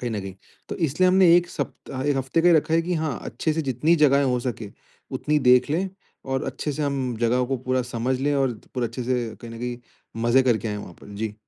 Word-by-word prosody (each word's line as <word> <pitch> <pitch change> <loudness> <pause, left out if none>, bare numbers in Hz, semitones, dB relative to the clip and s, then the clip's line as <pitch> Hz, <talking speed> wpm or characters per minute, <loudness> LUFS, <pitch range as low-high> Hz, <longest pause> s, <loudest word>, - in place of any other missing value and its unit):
कहीं 120 -2 -3
न 105 -2 -2
कहीं, 95 -1 -7 0.3
तो - - -4
इसलिए 170 +2 +2
हमने 185 -2 +6
1 175 0 +1
सप्ता 130 0 -5
1 145 -2 +1
हफ़्ते 135 +5 0
का 175 - +5
ही 170 - +6
रखा 160 +1 +2
है 165 - +3
कि 180 +1 -2
हाँ 155 -6 -2
अच्छे 140 +7 -2
से 160 0 -1
जितनी 140 +6 +2
जगहें 140 0 +4
हो 125 -2 +1
सके, 115 -4 -5 0.4
उतनी 150 0 0
देख 125 +2 +5
लें 185 +5 0 0.4
और 135 0 -2
अच्छे 135 +3 -3
से 150 +2 -3
हम 135 -4 -1
जगहों 125 +2 +2
को 135 0 -1
पूरा 130 +1 -1
समझ 125 +2 -1
लें 145 +1 +1
और 135 -3 +1 0.2
पूरा 125 -2 0
अच्छे 120 +3 -6
से 125 -1 0 0.2
कहीं 115 - -9
न 115 - -8
कहीं, 120 0 -4 0.5
मज़े 120 +3 +4
करके 115 -3 +1
आए 105 - -3
वहाँ 90 -4 -9
पर। - - -13
जी। 105 0 -4
130 Hz, 245 wpm, -24 LUFS, 120-150 Hz, 0.5 s, हमने